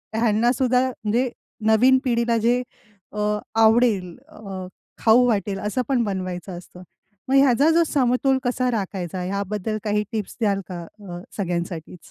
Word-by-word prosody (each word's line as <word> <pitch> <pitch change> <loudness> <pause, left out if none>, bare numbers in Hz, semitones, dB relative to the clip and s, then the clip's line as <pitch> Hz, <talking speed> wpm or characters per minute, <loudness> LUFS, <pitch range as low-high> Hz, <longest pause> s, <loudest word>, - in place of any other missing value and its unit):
ह्यांना 225 +1 +2
सुद्धा 255 0 +2
म्हणजे 240 +2 -1 0.4
नवीन 250 +4 +5
पिढीला 235 -2 +1
जे 245 +1 +3 0.5
अ, 210 - -6 0.4
आवडेल 220 -5 +3
अ, 195 -10 -8 0.3
खाऊ 235 +2 +5
वाटेल 200 -3 0
असं 210 +6 -1
पण 250 -4 +2
बनवायचं 185 -2 -4
असतं. 180 +1 -13 0.5
मग 270 - +3
ह्याचा 275 +2 +5
जो 335 +1 +4
समतोल 265 0 +2
कसा 250 0 0
राखायचा 190 -4 -3
ह्याबद्दल 200 +3 -3
काही 210 0 0
टिप्स 215 -4 -4
द्याल 200 -3 +1
का 175 -2 -5 0.2
अ, 180 -4 -8 0.2
सगळ्यांसाठीच? 175 -2 -4
215 Hz, 140 wpm, -23 LUFS, 190-245 Hz, 0.5 s, नवीन